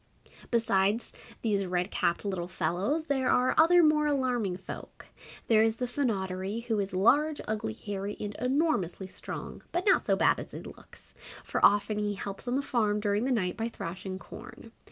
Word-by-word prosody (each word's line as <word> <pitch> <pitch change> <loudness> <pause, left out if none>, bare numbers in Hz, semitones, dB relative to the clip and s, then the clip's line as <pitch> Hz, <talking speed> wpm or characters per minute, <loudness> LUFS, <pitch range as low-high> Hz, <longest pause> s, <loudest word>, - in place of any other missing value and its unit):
Besides 220 -2 +1 0.3
these 205 -3 +1
red 180 +2 -1
capped 170 +4 0
Little 185 -3 -2
Fellows 185 - -1
there 275 -4 0
are 250 +1 +3
other 345 +2 +6
more 305 -1 +4
alarming 250 -9 0
folk. 190 - -9 0.4
There 220 -2 +4
is 225 0 +3
the 250 - -2
Fynoderee, 200 -5 -2
who 230 -3 -1
is 200 0 -2
large, 285 +11 +3
ugly, 215 - -2
hairy 200 - -5
and 205 0 -4
enormously 250 - 0
strong, 185 - -8
but 350 +1 -1
not 390 - +5
so - - +2
bad - - +3
as - - -7
he - - -8
looks, - - -14 0.3
for - - -3
often 205 +1 +4
he 205 -1 -1
helps 200 +4 -4
on 245 - 0
the 280 - 0
farm 215 -6 +1
during 205 +2 0
the 265 - 0
night 185 -7 0
by 225 0 -2
thrashing 185 -1 -6
corn. 225 +3 -11
215 Hz, 175 wpm, -29 LUFS, 195-255 Hz, 0.4 s, other